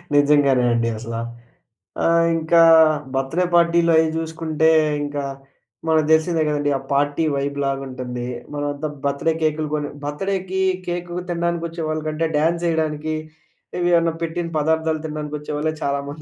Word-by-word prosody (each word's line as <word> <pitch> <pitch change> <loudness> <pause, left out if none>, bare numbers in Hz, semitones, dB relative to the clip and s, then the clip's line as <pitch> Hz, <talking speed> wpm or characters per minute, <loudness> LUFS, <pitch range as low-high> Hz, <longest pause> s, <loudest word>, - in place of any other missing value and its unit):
నిజంగానే 145 -3 +4
అండి 115 0 +1
అసల. 115 +1 -6 0.9
ఆహ్, 165 0 +4
ఇంకా 165 +1 +4 0.5
బర్త్‌‌‌డే 135 +7 0
పార్టీలయ్యి 170 -1 +4
చూసుకుంటే 160 -1 0 0.3
ఇంకా, 145 -1 -3 0.6
మనకు 155 -1 +3
తెలిసిందే 160 0 +2
కదండీ! 145 -1 0
ఆ - - -11
పార్టీ 145 +3 +1
వైబ్‌ 140 +1 -2
లాగుంటుంది. 130 -3 -4 0.3
మనమంతా 145 +1 -3 0.2
బర్త్‌డే 140 +3 +1
కేకులు 155 0 0
కొని 150 -1 -3 0.2
బర్త్‌డేకి 190 +5 -2 0.3
కేకు 175 0 -4
తినడానికొచ్చే 170 -1 -2
వాళ్ళకంటే 155 +1 -1
డ్యాన్స్ 170 +3 +1
యేయడానికి, 155 -1 -1 0.6
ఏవి 175 0 +2
అన్న 165 - +1
పెట్టిన 165 +1 -3
పదార్థాలు 160 0 0
తినడానికి 150 -1 -5
వచ్చేవాళ్లే 150 +1 -2
చాలా 140 0 0
మంది 150 +2 -8
155 Hz, 125 wpm, -21 LUFS, 145-165 Hz, 0.9 s, నిజంగానే